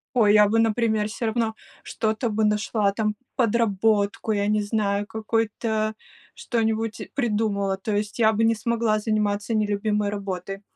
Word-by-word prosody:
О, 225 -4 +4
я 210 0 +6
бы, 225 +2 +2
например, 220 -1 +2
всё 225 +2 -4
равно 220 0 0 0.3
что-то 220 +2 -1
бы 215 +1 0
нашла 210 -1 +1
там, 215 0 -1 0.2
подработку, 220 -2 +1
я 205 0 0
не 210 0 +2
знаю, 205 -1 -1
какой-то 220 0 -1 0.4
что-нибудь 225 -1 -2
придумала, 210 -6 0
то 205 +2 -3
есть 210 +2 -3
я 220 -1 +4
бы 220 +1 0
не 225 0 +4
смогла 225 0 0
заниматься 210 0 -1
нелюбимой 210 0 0
работой. 195 -1 -5
215 Hz, 145 wpm, -24 LUFS, 205-225 Hz, 0.4 s, я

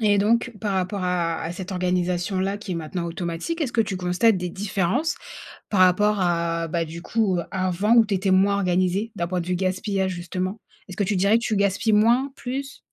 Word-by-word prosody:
et 205 -2 +3
donc 230 +5 +2
par 205 -2 0
rapport 190 +1 -1
à 175 -2 0
à 165 - -3
cette 185 +2 -7
organisation-là 180 +2 -1
qui 205 -3 -6
est - - -2
maintenant 170 +2 -4
automatique, 170 - -4
est-ce 270 -6 0
que 225 - +3
tu 190 -4 -4
constates 185 +4 +2
des 180 0 -3
différences 200 - -1 0.6
par 200 - +1
rapport 205 +3 +4
à, 170 -2 0
bah, 165 +1 -1
du 165 +2 -8
coup, 200 -3 0
avant 185 +4 +1
où 230 -2 +7
tu 205 - -2
étais 190 +1 0
moins 195 +2 +4
organisée? 185 +3 0
D'un 175 - -1
point 180 +1 -1
de 170 - -8
vue 180 - 0
gaspillage 190 +1 -1
justement? 185 +4 -4 0.3
Est-ce 185 - -9
que 200 - +1
tu 205 - 0
dirais 200 +4 +4
que 235 - -8
tu 220 - 0
gaspilles 200 +2 +1
moins, 240 +6 +3
plus? 270 +3 -5
190 Hz, 210 wpm, -24 LUFS, 180-210 Hz, 0.6 s, où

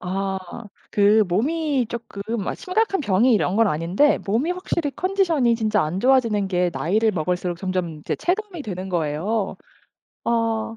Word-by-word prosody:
아 190 +1 -2 0.5
그 210 +1 +5
몸이 275 - 0
쪼끔 225 -2 -5
아 - - -2
심각한 390 0 0
병이 235 0 +3
이런 195 -2 +1
건 225 0 +4
아닌데 175 - +2
몸이 235 - +1
확실히 350 -4 -2
컨디션이 345 -11 +1
진짜 215 -3 +1
안 175 +5 -3
좋아지는 230 -6 +3
게 180 -1 +1
나이를 215 +8 +1
먹을수록 180 +1 -2
점점 185 -4 -3
이제 - - -3
체감이 370 -3 -2
되는 190 -3 -5
거예요. 175 +5 -1 0.7
아 225 -1 0
215 Hz, 305 characters per minute, -22 LUFS, 185-270 Hz, 0.7 s, 그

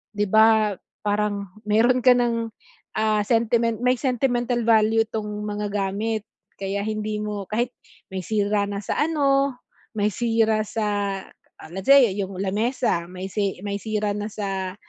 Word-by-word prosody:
'di 205 0 +1
ba, 220 -1 +5 0.3
parang 205 -1 -1 0.2
mayro'n 235 +4 +4
ka 255 - +8
ng, 230 -2 0 0.5
ah, 215 -1 +2
sentiment 230 -1 +2
may 250 0 +3
sentimental 245 -2 0
value 220 0 +4
itong 220 -2 -4 0.2
mga 210 0 -3
gamit, 205 +2 -1 0.4
kaya 195 +1 -2
hindi 215 0 -2
mo 210 -2 -4
kahit 235 +3 0 0.4
may 190 - -2
sira 205 0 +1
na 200 0 -4
sa - - -2
ano, 280 -4 +2 0.4
may 210 0 +2
sira 225 -1 +2
sa, 220 +1 -2 0.8
ah, - - -11
let 190 +1 -5
say 275 -4 +7
yung 195 -1 -3
lamesa 205 -2 0
may 185 +1 -6
sey 200 -3 -1
may 200 0 -2
sira 210 -2 -1
na 210 0 -3
sa, 195 -3 -3
215 Hz, 150 wpm, -24 LUFS, 205-230 Hz, 0.8 s, ka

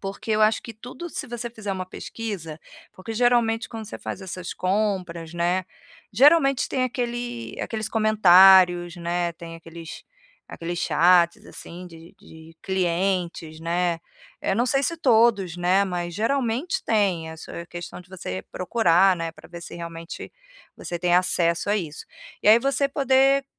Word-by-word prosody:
porque 195 +3 -6
eu 215 - +1
acho 215 +1 +3
que 230 - -8
tudo, 250 +10 -9
se - - -5
você 240 -1 -5
fizer 215 -4 -5
uma 185 -1 -4
pesquisa, 185 -7 -6 0.3
porque 205 +4 -8
geralmente 235 -1 +2
quando 225 -2 -7
você - - -8
faz 195 - -6
essas 185 -1 -6
compras, 185 -4 -2
né, 175 +2 0 0.5
geralmente 275 +2 +4
tem 260 - -1
aquele 240 -1 -4
aqueles 220 -2 -4
comentários, 190 -5 +6
né, 175 0 -2
tem 165 0 -9
aqueles 165 0 -10 0.5
aqueles 170 +1 -5
chats, 170 +2 +3
assim, 180 +2 -10
de 165 0 -14
de 160 0 -15
clientes, 175 -3 -1
né, 170 0 -1 0.4
eu 195 - 0
não 240 - +2
sei 275 +2 +1
se 335 +4 -1
todos, 220 - +3
né, 185 +3 +2
mas 175 -2 -4
geralmente 265 - -1
tem, 185 -7 +1
eh, 160 - -9
só - - -11
é 170 - -6
questão 175 +1 -8
de 180 - -18
você 95 - -6
procurar, 185 -2 +3
né, 165 -1 -3
para 160 0 -16
ver 170 0 -9
se - - -9
realmente 170 0 -8 0.4
você 175 - -5
tem 175 0 +1
acesso 175 0 +2
a 210 - +3
isso. 160 -6 -5 0.4
E - - +3
aí 220 +2 +8
você 275 +2 0
poder, 275 0 +3
185 Hz, 160 wpm, -24 LUFS, 170-225 Hz, 0.5 s, aí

